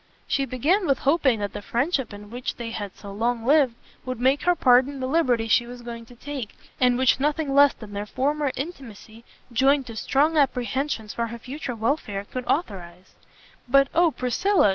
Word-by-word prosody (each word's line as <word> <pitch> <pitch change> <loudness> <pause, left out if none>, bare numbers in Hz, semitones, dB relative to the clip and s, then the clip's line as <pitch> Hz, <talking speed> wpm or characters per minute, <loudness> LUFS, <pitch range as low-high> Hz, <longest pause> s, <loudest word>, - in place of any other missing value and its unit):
She 275 - 0
began 310 - +1
with 275 - +3
hoping 270 -7 +2
that 205 - -3
the - - -6
friendship 260 - -1
in 205 +1 -11
which 245 +1 -4
they 230 -1 -6
had 205 -3 -6
so 200 - -10
long 230 +3 -1
lived 275 -3 +4 0.3
would 255 -2 -5
make 265 +3 +2
her 355 0 +4
pardon 260 0 +3
the 260 - -2
liberty 255 -6 +1
she 235 +2 +3
was 245 0 -10
going 235 -1 -8
to 245 - -15
take, 270 -3 -6 0.2
and 250 -1 +3
which 260 0 +3
nothing 295 0 0
less 285 0 +6
than 210 -2 -11
their 205 +1 -4
former 285 +4 0
intimacy, 235 - -8 0.3
joined 270 +3 +3
to 230 - -9
strong 295 +8 +1
apprehensions 255 -3 0
for 235 0 -2
her 235 +1 -7
future 255 +1 -6
welfare, 220 -4 -2
could 250 +4 -6
authorise; 185 - -3 0.5
"But 275 +2 +4
oh 340 +1 +4
Priscilla!" 305 - +2
255 Hz, 185 wpm, -24 LUFS, 230-280 Hz, 0.5 s, less